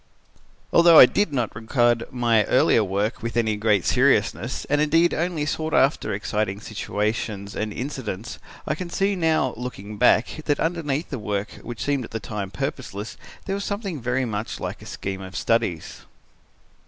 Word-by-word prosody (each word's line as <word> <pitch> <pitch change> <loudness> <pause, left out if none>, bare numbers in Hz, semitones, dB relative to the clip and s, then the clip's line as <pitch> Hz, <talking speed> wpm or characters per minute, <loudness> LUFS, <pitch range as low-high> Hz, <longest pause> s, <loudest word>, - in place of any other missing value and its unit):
"Although 170 -1 +7
I - - +12
did 205 +6 0
not 125 -7 -2
regard 120 +1 +1
my 120 -3 +3
earlier 115 -3 +4
work 100 +3 -2
with 115 +1 -4
any 110 -2 +2
great 105 -3 +1
seriousness - - +1
and 145 +1 +1
indeed 165 +3 +3
only 170 -3 -1
sought 155 +1 -2
after 135 -5 +2
exciting 105 0 -2
situations 105 -1 -3
and 110 0 -2
incidents, 120 -4 -5 0.3
I - - 0
can 175 +2 -6
see 195 +3 0
now, 160 -7 +1
looking 105 -4 -7
back, 125 +5 +3
that 145 - +1
underneath 160 -3 -1
the 135 - -3
work 105 -1 -3
which 120 -1 -6
seemed 140 -2 0
at - - -8
the 110 - -4
time 100 -2 -5
purposeless, 100 +2 -5 0.3
there 195 - -2
was 200 0 -2
something 200 - -4
very 125 +2 0
much 110 -1 -4
like - - -5
a - - -11
scheme 95 -1 -5
of 95 -1 -9
studies. 115 -7 -1
120 Hz, 165 wpm, -24 LUFS, 105-150 Hz, 0.3 s, I